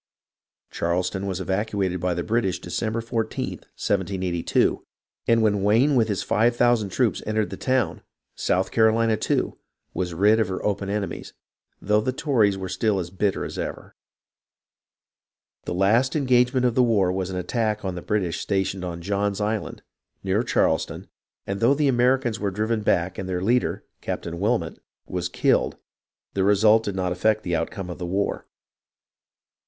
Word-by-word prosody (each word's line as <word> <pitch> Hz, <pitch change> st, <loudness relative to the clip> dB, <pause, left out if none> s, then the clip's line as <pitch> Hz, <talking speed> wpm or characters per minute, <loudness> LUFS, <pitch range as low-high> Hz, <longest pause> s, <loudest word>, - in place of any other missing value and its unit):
Charleston 90 Hz, +3 st, -1 dB
was 95 Hz, -1 st, -3 dB
evacuated 95 Hz, -1 st, -1 dB
by 90 Hz, 0 st, 0 dB
the 85 Hz, -, -2 dB
British 110 Hz, -6 st, 0 dB
December 110 Hz, +6 st, -3 dB
14th, 115 Hz, -1 st, -3 dB
1782, 95 Hz, -3 st, 0 dB, 0.4 s
and 115 Hz, -1 st, +4 dB
when 105 Hz, -2 st, +2 dB
Wayne 115 Hz, +9 st, +4 dB
with 115 Hz, -3 st, +3 dB
his 100 Hz, -3 st, -1 dB
five 115 Hz, +2 st, +2 dB
thou 120 Hz, 0 st, +5 dB
sand 105 Hz, -5 st, -2 dB
troops 120 Hz, +1 st, +1 dB
entered 110 Hz, -1 st, 0 dB
the -, -, -4 dB
town, 130 Hz, -10 st, 0 dB, 0.3 s
South 95 Hz, +1 st, 0 dB
Carolina, 110 Hz, 0 st, +3 dB
too, -, -, -1 dB, 0.3 s
was 90 Hz, -2 st, -3 dB
rid 105 Hz, +5 st, +4 dB
of 110 Hz, -, +2 dB
her 95 Hz, 0 st, -4 dB
open 100 Hz, -1 st, -1 dB
enemies, 100 Hz, -1 st, -4 dB, 0.5 s
though 105 Hz, +2 st, +2 dB
the 130 Hz, -, -1 dB
Tories 120 Hz, -8 st, +2 dB
were 95 Hz, -1 st, -4 dB
still 100 Hz, +3 st, 0 dB
as 85 Hz, -2 st, -4 dB
bitter 95 Hz, +1 st, -1 dB
as -, -, -6 dB
ever. -, -, -6 dB, 1.7 s
The -, -, -3 dB
last 110 Hz, -, +3 dB
engagement 125 Hz, -2 st, +3 dB
of 120 Hz, -, +2 dB
the 125 Hz, -, +3 dB
war 105 Hz, -7 st, +3 dB
was 95 Hz, 0 st, -2 dB
an 95 Hz, -, -4 dB
attack 105 Hz, +2 st, -1 dB
on 95 Hz, -, -2 dB
the 90 Hz, -, -6 dB
British 95 Hz, -5 st, -1 dB
stationed 95 Hz, -1 st, -1 dB
on 85 Hz, -1 st, -5 dB
John's 100 Hz, +1 st, -1 dB
Island, 105 Hz, +1 st, -3 dB, 0.4 s
near 95 Hz, +3 st, +1 dB
Charleston, -, -, 0 dB, 0.4 s
and 100 Hz, 0 st, -3 dB
though 120 Hz, +6 st, +4 dB
the 150 Hz, 0 st, +2 dB
Americans 125 Hz, -2 st, +2 dB
were 100 Hz, -, 0 dB
driven 110 Hz, +3 st, -1 dB
back 90 Hz, -3 st, 0 dB
and 95 Hz, -1 st, -5 dB
their 90 Hz, 0 st, -2 dB
leader. 120 Hz, +5 st, +1 dB, 0.2 s
Captain 85 Hz, 0 st, -4 dB
Wilmot, 110 Hz, +4 st, 0 dB, 0.3 s
was 90 Hz, -1 st, -3 dB
killed, -, -, +1 dB, 0.6 s
the 95 Hz, -, +1 dB
result 105 Hz, +3 st, +5 dB
did 100 Hz, -, -3 dB
not 90 Hz, -1 st, -1 dB
affect 110 Hz, +4 st, +1 dB
the 90 Hz, -1 st, -1 dB
outcome 90 Hz, +2 st, -3 dB
of 90 Hz, -, -8 dB
the 90 Hz, -, -4 dB
war. 100 Hz, +3 st, -2 dB
100 Hz, 165 wpm, -24 LUFS, 95-115 Hz, 1.7 s, thou